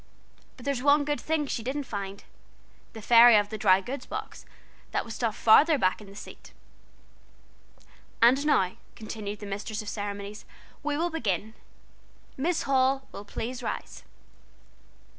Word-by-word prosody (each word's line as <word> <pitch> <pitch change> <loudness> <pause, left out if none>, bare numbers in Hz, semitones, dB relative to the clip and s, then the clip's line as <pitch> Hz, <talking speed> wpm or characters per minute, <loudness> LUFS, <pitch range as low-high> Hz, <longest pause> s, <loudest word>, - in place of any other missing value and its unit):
But 250 - -13
there's 280 -3 -1
one 285 +1 +4
good 295 0 -2
thing 310 -1 0
she 270 - -3
didn't 270 +5 -3
find 200 -5 -6 0.7
'The 220 -2 -10
Fairy 235 +1 +8
of 205 0 +1
the 215 - -5
Dry 190 -2 +5
Goods 265 +8 -6
Box,' - - -7 0.4
that - - -2
was 225 - -7
stuffed 225 -2 -2
farther 295 +8 +6
back 185 -3 +1
in 210 - -12
the 195 - -13
seat. - - -12 1.7
"And 255 +4 +5
now," 195 -12 +2 0.2
continued 210 -2 -6
the - - -6
mistress 210 +2 -4
of 205 - -6
ceremonies, 205 0 -5 0.4
"we 290 -1 -2
will 340 +2 0
begin. 220 - -2 0.8
Miss 325 +5 0
Hall 270 0 +1
will 200 - -9
please 235 +4 -5
rise." - - -5
230 Hz, 150 wpm, -27 LUFS, 205-275 Hz, 1.7 s, Fairy